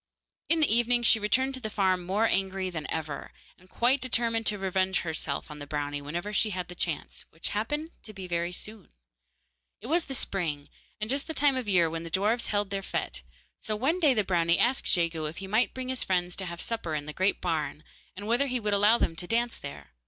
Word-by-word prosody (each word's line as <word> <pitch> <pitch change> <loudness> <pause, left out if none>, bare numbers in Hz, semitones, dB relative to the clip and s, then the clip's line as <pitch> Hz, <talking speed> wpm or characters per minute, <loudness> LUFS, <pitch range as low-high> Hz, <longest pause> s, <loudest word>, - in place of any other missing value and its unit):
In 330 -1 +4
the 280 -7 +5
evening 240 0 +3
she 225 -1 +6
returned 260 +6 +2
to 260 - -5
the 220 -4 -4
farm 190 -3 +1
more 200 +5 +2
angry 190 -2 0
than 160 -3 -5
ever, 155 -3 -4 0.3
and 185 0 -21
quite 255 +6 +2
determined 230 -3 0
to 210 - +1
revenge 190 -1 +1
herself 160 -1 -3
on 150 - -8
the 145 - -8
brownie 145 -1 -2
whenever 175 +8 -4
she 215 - +3
had 185 -3 -4
the - - -6
chance, 170 -3 -3
which 165 - -4
happened 295 +10 -2
to 215 - -9
be 195 -3 -8
very 170 0 -1
soon. 210 +2 -7 0.9
It 210 - -12
was 325 +6 +1
the 270 - -1
spring, 160 - -1 0.3
and 215 - -2
just 275 +4 -1
the 320 - -4
time 285 -2 +4
of 250 -5 -2
year 175 -4 +4
when 165 0 -4
the 165 - -6
dwarfs 210 +7 +1
held 205 -1 -1
their 195 -1 -1
fete, 190 - -3 0.4
so 215 - -2
one 280 +11 +1
day 295 -7 +4
the 210 - +2
brownie 170 -2 +2
asked 255 +3 +2
Jegu 165 -3 +1
if 155 +2 -5
he 195 - -5
might 215 +5 +2
bring 255 0 -4
his 260 -1 -1
friends 180 -1 0
to 190 - -2
have 170 -1 -6
supper 200 -9 -2
in 145 -1 -3
the 150 - -6
great 190 +4 +1
barn, 155 -3 -2 0.3
and 205 +2 -7
whether 240 +6 +2
he 250 -1 0
would 210 -2 0
allow 205 +3 +5
them 165 - 0
to 175 - -6
dance 235 +2 +1
there. 70 -1 -9
195 Hz, 230 wpm, -28 LUFS, 170-235 Hz, 0.9 s, she